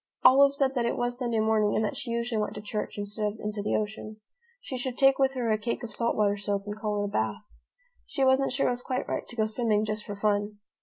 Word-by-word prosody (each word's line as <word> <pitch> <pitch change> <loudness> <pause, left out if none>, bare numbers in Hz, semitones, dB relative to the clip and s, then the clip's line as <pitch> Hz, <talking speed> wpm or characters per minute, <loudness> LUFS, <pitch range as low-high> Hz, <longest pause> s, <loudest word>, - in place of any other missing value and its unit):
Olive 275 +1 +7
said 270 -1 +2
that 240 -3 0
it - - -1
was 245 +1 -1
Sunday 235 -3 0
morning 215 -1 +2
and 220 - +2
that - - -3
she 245 - -5
usually 235 -1 -1
went 210 - -3
to 210 - -6
church 210 0 -4
instead 205 +1 -2
of 220 - -15
into 210 0 -3
the 205 - 0
ocean. 215 0 -3 0.4
She 380 - -6
should 250 0 -3
take 270 0 +5
with 270 0 +2
her 240 -3 0
a 215 - +1
cake 235 +3 -3
of 225 -3 -6
salt 235 +1 0
water 205 -1 +2
soap 200 0 -2
and 205 0 -4
call 210 -1 -2
it - - 0
a 200 - -5
bath. 110 - -1 0.6
She 275 - -1
wasn't 265 +1 +3
sure 275 +2 +1
it - - +3
was 245 0 -3
quite 255 0 -3
right - - -3
to 240 - -6
go 220 -2 +2
swimming 215 -1 +1
just 215 0 -3
for 205 - -6
fun. 205 0 0
220 Hz, 265 wpm, -28 LUFS, 210-245 Hz, 0.6 s, Olive